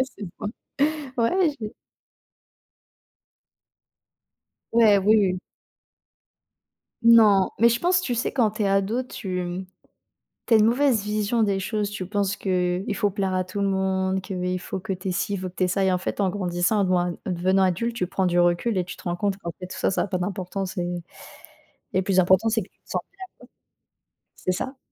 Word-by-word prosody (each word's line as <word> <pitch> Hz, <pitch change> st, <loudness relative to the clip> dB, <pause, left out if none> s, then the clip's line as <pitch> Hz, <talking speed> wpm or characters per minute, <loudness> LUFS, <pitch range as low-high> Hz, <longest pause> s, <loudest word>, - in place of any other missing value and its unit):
Ouais, -, -, +3 dB
c'est 205 Hz, -, -6 dB
moi. 205 Hz, -, -3 dB, 0.7 s
Ouais, 330 Hz, +9 st, +3 dB
j'ai 215 Hz, 0 st, -5 dB, 3.0 s
Ouais, 225 Hz, -3 st, +6 dB
oui, 210 Hz, +3 st, +4 dB
oui. 185 Hz, -3 st, +2 dB, 1.7 s
Non, 215 Hz, -5 st, +6 dB
mais 235 Hz, -, +7 dB
je 235 Hz, 0 st, +1 dB
pense, 360 Hz, +1 st, +3 dB
tu 255 Hz, -9 st, -2 dB
sais, 235 Hz, -, -1 dB
quand 235 Hz, -6 st, +2 dB
tu 215 Hz, -, -5 dB
es 200 Hz, -, +2 dB
ado, 195 Hz, +6 st, +1 dB
tu, 190 Hz, -7 st, -5 dB
hem, 180 Hz, +1 st, -4 dB, 0.8 s
tu 235 Hz, -, +4 dB
as -, -, +9 dB
une 215 Hz, -, +5 dB
mauvaise 240 Hz, -1 st, +3 dB
vision 215 Hz, +2 st, 0 dB
des 200 Hz, -2 st, +1 dB
choses, 210 Hz, +1 st, -2 dB
tu 200 Hz, -3 st, -5 dB
penses 200 Hz, 0 st, -1 dB
que, 180 Hz, -2 st, 0 dB
heu, 190 Hz, -, -5 dB
il 205 Hz, -, -1 dB
faut 205 Hz, 0 st, +1 dB
plaire 195 Hz, -1 st, -1 dB
à 185 Hz, 0 st, 0 dB
tout 185 Hz, +2 st, -5 dB
le 200 Hz, -, +1 dB
monde, 190 Hz, 0 st, 0 dB
qu'il 185 Hz, -1 st, -2 dB
faut 185 Hz, +1 st, -5 dB
que 195 Hz, 0 st, -3 dB
tu 185 Hz, +1 st, -6 dB
aies -, -, 0 dB
ci, 200 Hz, +3 st, -1 dB
faut 185 Hz, -1 st, -5 dB
que -, -, -29 dB
tu 185 Hz, -, +2 dB
aies -, -, +1 dB
ça 195 Hz, +1 st, +1 dB
et 190 Hz, -, +3 dB
en 180 Hz, -, +1 dB
fait, 185 Hz, -, -4 dB
en 190 Hz, -, +2 dB
grandissant, 185 Hz, +2 st, 0 dB
bon, 185 Hz, -1 st, +2 dB, 0.3 s
en -, -, -1 dB
devenant 185 Hz, +2 st, +2 dB
adulte, 190 Hz, +6 st, 0 dB
tu 180 Hz, -, 0 dB
prends 190 Hz, +1 st, -1 dB
du 175 Hz, -1 st, +3 dB
recul 175 Hz, +5 st, +2 dB
et 180 Hz, -, 0 dB
tu -, -, -8 dB
te -, -, -14 dB
rends 175 Hz, -1 st, -2 dB
compte 200 Hz, +1 st, -1 dB
qu'en 170 Hz, -3 st, -6 dB
fait, 180 Hz, -, -5 dB
tout 185 Hz, -, -9 dB
ça, -, -, +1 dB
ça 190 Hz, -, 0 dB
a -, -, -2 dB
pas 185 Hz, -, -1 dB
d'importance 185 Hz, +1 st, -4 dB
et 175 Hz, 0 st, -2 dB, 0.9 s
et -, -, +4 dB
le -, -, -1 dB
plus 190 Hz, 0 st, +2 dB
important, 185 Hz, +4 st, +4 dB
c'est 220 Hz, -1 st, 0 dB
que -, -, -17 dB
tu -, -, -42 dB
te -, -, -29 dB
sens -, -, -1 dB
bien, 395 Hz, -, -33 dB, 1.0 s
quoi. -, -, -63 dB
C'est 185 Hz, -, -1 dB
ça. 260 Hz, +9 st, -4 dB
195 Hz, 215 wpm, -24 LUFS, 185-215 Hz, 3.0 s, as